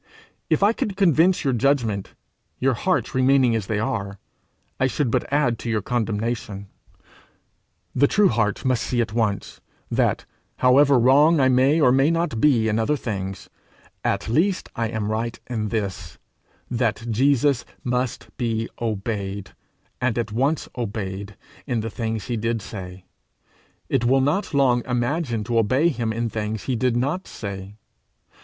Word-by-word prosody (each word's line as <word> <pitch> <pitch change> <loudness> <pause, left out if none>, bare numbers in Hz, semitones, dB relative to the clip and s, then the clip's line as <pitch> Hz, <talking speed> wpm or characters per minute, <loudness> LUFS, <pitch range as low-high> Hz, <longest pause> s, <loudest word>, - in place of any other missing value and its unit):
If - - +2
I 210 +3 +5
could 200 -4 -3
convince 180 -1 +3
your 135 -3 +1
judgment, 120 -6 0 0.4
your 135 0 +2
hearts 180 +8 0
remaining 130 -2 +3
as 105 -4 -2
they 110 - -1
are, 100 -2 -2 0.6
I 130 - +3
should 130 -1 -1
but - - -1
add 140 -6 +1
to 120 - -5
your 110 -3 0
condemnation. 110 -3 -2 1.2
The 145 - +4
true 205 +5 +4
heart 110 -1 0
must 130 -3 +2
see 125 - -1
at 115 -2 -1
once, 105 -4 -2 0.3
that, - - +1 0.3
however 135 +2 +5
wrong 145 +7 +5
I 130 -1 +4
may 130 +5 +4
or 135 -5 +5
may 135 +3 +4
not 165 -9 -1
be 125 -7 +4
in 110 0 +1
other 145 +7 +1
things, 95 -6 -5 0.6
at - - -1
least 175 - +1
I 115 0 0
am 110 -2 -3
right 115 +2 -2
in 110 -4 -3
this, 95 -7 -4 0.5
that 115 -2 -1
Jesus 135 +2 +2 0.2
must 125 0 -2
be 115 -3 -1
obeyed, 100 -3 -3 0.5
and 125 -2 0
at 115 -2 -2
once 135 +7 0
obeyed, 100 -3 -5 0.3
in 120 -3 0
the 115 0 -4
things 110 -2 -3
he 120 - -2
did 115 -1 -1
say: 95 -3 -8 0.8
it 125 -3 0
will 135 +2 +4
not 150 +10 0
long 130 -4 +3
imagine 125 -1 -1
to 115 +1 +1
obey 130 +9 +3
him 120 -7 -2
in 115 +1 -1
things 110 -1 -3
he 130 - -1
did 125 0 +1
not 145 +10 -1
say. 100 -1 -7
120 Hz, 155 wpm, -23 LUFS, 110-135 Hz, 1.2 s, I